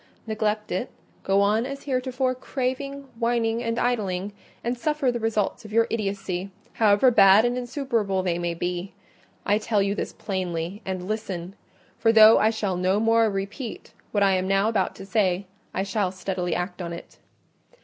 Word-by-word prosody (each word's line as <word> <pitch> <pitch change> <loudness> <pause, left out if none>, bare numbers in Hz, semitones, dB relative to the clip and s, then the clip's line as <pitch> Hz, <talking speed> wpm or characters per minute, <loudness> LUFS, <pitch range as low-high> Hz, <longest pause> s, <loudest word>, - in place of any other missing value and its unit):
Neglect 215 -1 -1
it—go 195 +1 -2
on 210 +3 +3
as 275 0 -7
heretofore, 255 -1 -1
craving, 265 +2 -3 0.2
whining, 230 -1 +1
and 230 -1 -2
idling—and 205 0 -2
suffer 295 0 0
the 240 - -3
results 220 -3 -1
of 215 - -11
your 230 +1 +4
idiocy, 195 -3 -2 0.2
however 215 +3 +4
bad 200 0 +7
and 245 0 +1
insufferable 235 -7 -1
they 175 -2 0
may 175 -1 -2
be. 180 +2 -4 0.5
I 205 +1 +3
tell 215 -1 0
you 200 0 0
this - - -3
plainly; 185 -1 -4
and 185 -1 -3
listen: 195 -4 -4 0.5
for 225 - +4
though 220 0 +8
I 215 - +4
shall 205 -5 -2
no 185 +3 +2
more 225 0 +3
repeat 200 +4 -5 0.2
what 205 -1 +2
I 195 - +4
am 185 0 +1
now 195 +2 +2
about 200 -5 0
to 195 - -9
say, 195 -2 +1 0.3
I 190 - -1
shall 195 -1 -1
steadily 185 -2 -3
act 180 +1 -3
on 170 -1 -4
it. 170 - -11
210 Hz, 165 wpm, -25 LUFS, 190-230 Hz, 0.5 s, though